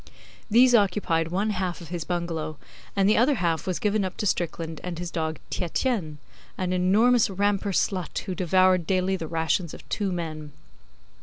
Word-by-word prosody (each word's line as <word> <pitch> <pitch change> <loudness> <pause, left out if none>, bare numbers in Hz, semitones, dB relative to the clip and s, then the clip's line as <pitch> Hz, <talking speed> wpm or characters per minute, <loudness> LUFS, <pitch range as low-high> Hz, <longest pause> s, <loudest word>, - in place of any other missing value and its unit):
These 245 +3 +6
occupied 190 -6 +2
one 195 +6 0
half 185 -3 -2
of 170 -3 -11
his 170 -3 -4
bungalow, 165 -3 -3 0.4
and 195 -1 +3
the 210 - +4
other 265 +5 +4
half 170 -6 -1
was 185 - 0
given 210 -1 +1
up 185 - -4
to - - -2
Strickland 165 -4 -2
and 180 -2 -4
his 175 0 -5
dog 160 -1 -2
Tietjens 180 - -1 0.4
an 185 -1 -1
enormous 210 +7 +4
Rampur 200 +1 0
slut 185 -1 -1
who 190 - -4
devoured 185 -1 +3
daily 190 0 +1
the 165 -4 -5
rations 165 +1 -1
of - - -14
two 200 -3 -1
men. 155 -4 -5
185 Hz, 170 wpm, -26 LUFS, 165-200 Hz, 0.4 s, These